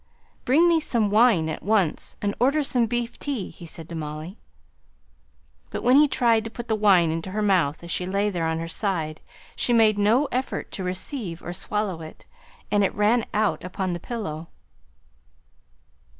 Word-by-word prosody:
"Bring 310 +7 +5
me 335 -1 +4
some 230 -9 0
wine 210 -7 +4
at 160 - -4
once, 200 -6 0
and 200 0 0
order 280 +5 +3
some 245 -4 +1
beef 240 +1 -3
tea," 270 -9 -4
he 170 - -12
said 160 0 -8
to - - -7
Molly. 155 +4 -6 1.3
But - - -5
when 250 +2 +5
he 300 +1 +7
tried 230 -4 +2
to 225 - -5
put 240 +1 -8
the 220 - +1
wine 190 -6 +4
into 165 +3 -4
her 210 +3 -2
mouth 175 -7 +1
as 170 - -7
she 180 - -2
lay 200 +2 0
there 170 -3 -1
on 160 0 -1
her 165 0 -4
side, 165 -4 -2 0.3
she 240 - 0
made 220 -3 +4
no 225 +8 +3
effort 255 +2 -3
to 190 - -5
receive 185 - -4
or 175 - -5
swallow 195 -2 -3
it, 155 - -11 0.5
and 205 -1 +3
it 195 - 0
ran 215 +3 +2
out 205 -7 0
upon 185 0 -3
the 175 - -4
pillow. 170 -7 -5
205 Hz, 180 wpm, -24 LUFS, 170-235 Hz, 1.3 s, he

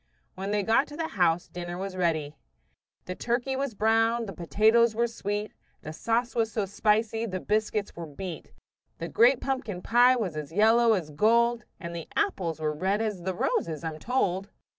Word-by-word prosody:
When 195 +1 -5
they 205 0 0
got 225 +7 +3
to 295 - -10
the 325 -1 -2
house 175 -2 +1
dinner 175 0 -6
was 195 +1 -4
just 185 - -7
ready. 155 -4 0 0.7
The 185 - -4
turkey 240 +6 -1
was 270 -4 -3
brown, 225 +2 +2
the 195 - -7
potatoes 220 +6 +3
were 235 +1 +2
sweet, 210 -2 -4 0.3
The 155 - -6
sauce 230 +7 -1
was 225 -1 0
so 210 -2 -1
spicy, 220 +3 0
the 185 -2 -3
biscuits 210 0 -1
were 170 -1 -6
beat, 165 +3 -7 0.5
The 165 - -5
great 240 - +4
pumpkin 230 -9 -3
pie 245 +2 +5
was 200 -10 -2
as 150 0 -5
yellow 225 +4 +4
as 170 -7 -2
gold, 235 +6 +2
And 170 -3 -6
the 165 - -6
apples 180 - -1
were 155 -1 -1
red 190 +7 0
as 215 -5 -2
the 185 +1 -3
roses, 160 -2 -1
I'm 160 -1 -4
told. 195 -5 -1
210 Hz, 185 wpm, -27 LUFS, 175-230 Hz, 0.7 s, pie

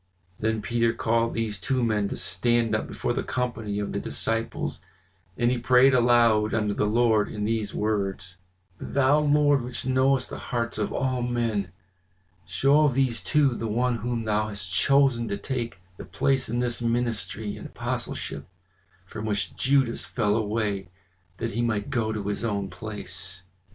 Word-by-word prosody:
Then 110 -1 -1
Peter 115 +2 +1
called 115 0 0
these 110 -3 -2
two 130 +4 0
men 105 -3 +1
to - - -4
stand 120 -2 +2
up 110 - 0
before - - -2
the - - -1
company 115 -5 -3
of 105 0 -3
the - - -1
disciples, 115 0 -2 0.6
and 120 0 +2
he 125 - 0
prayed 125 +2 +5
aloud 115 -3 +4
unto 105 -2 0
the 105 - 0
Lord 110 -1 +3
in 105 -1 -3
these 110 -2 -1
words: 95 -3 -2 0.4
"Thou, 140 +2 +2
Lord, 145 -2 +3
which 120 0 -6
knowest 130 0 +2
the - - -5
hearts 115 -2 -3
of 105 - -1
all 130 -2 -1
men, 115 -6 -1 0.8
show 140 +12 +4
of 135 -4 +1
these 125 -7 +1
two 145 +2 +3
the 115 -1 -3
one 120 +3 +1
whom 115 +1 -2
thou 110 0 0
hast 100 -4 -5
chosen 135 -4 +3
to 100 -1 -2
take 120 -2 -4 0.2
the - - -8
place 135 -3 0
in 120 +2 0
this 120 -1 -1
ministry 115 -3 -2
and - - -8
apostleship, - - -4 0.6
from 110 +3 -7
which 105 -1 -1
Judas 130 -3 +2
fell 105 -4 0
away 105 -4 -1 0.5
that 115 0 -3
he 120 - -1
might 110 -3 -1
go 110 -2 0
to 105 -2 -3
his 105 +2 -2
own 100 -4 -2
place." 95 -2 -6
115 Hz, 165 wpm, -26 LUFS, 105-125 Hz, 0.8 s, prayed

